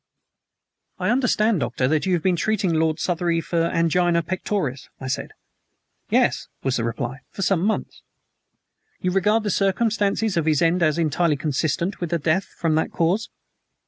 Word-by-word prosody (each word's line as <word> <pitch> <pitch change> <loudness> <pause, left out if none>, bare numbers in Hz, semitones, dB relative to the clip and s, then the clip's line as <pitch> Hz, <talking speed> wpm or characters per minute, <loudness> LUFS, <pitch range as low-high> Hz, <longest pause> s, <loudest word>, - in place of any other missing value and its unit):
"I - - 0
understand, 230 -5 +2
Doctor, 125 +1 0
that 155 +5 +1
you 185 - +2
had 170 - 0
been 185 -2 +3
treating 195 0 0
Lord 160 0 +1
Southery 170 -1 0
for 165 0 0
angina 170 +1 +2
pectoris?" 170 -6 -3
I 130 - -7
said. 140 +2 -3 0.8
"Yes," - - +2 0.2
was 135 -1 0
the 115 - -1
reply, 120 +3 -3
"for 195 - -5
some 185 -2 +2
months." 220 +2 -2 1.0
"You 180 - 0
regard 210 +4 +2
the 205 - -1
circumstances 205 0 +1
of 160 -1 0
his 155 -2 +3
end 170 +2 +2
as 155 -2 +2
entirely 160 -1 +1
consistent 155 +6 -1
with 175 - -3
a - - +3
death 165 +4 +1
from 165 -3 -2
that 160 - 0
cause?" 175 +7 0
170 Hz, 165 wpm, -23 LUFS, 155-195 Hz, 1.0 s, been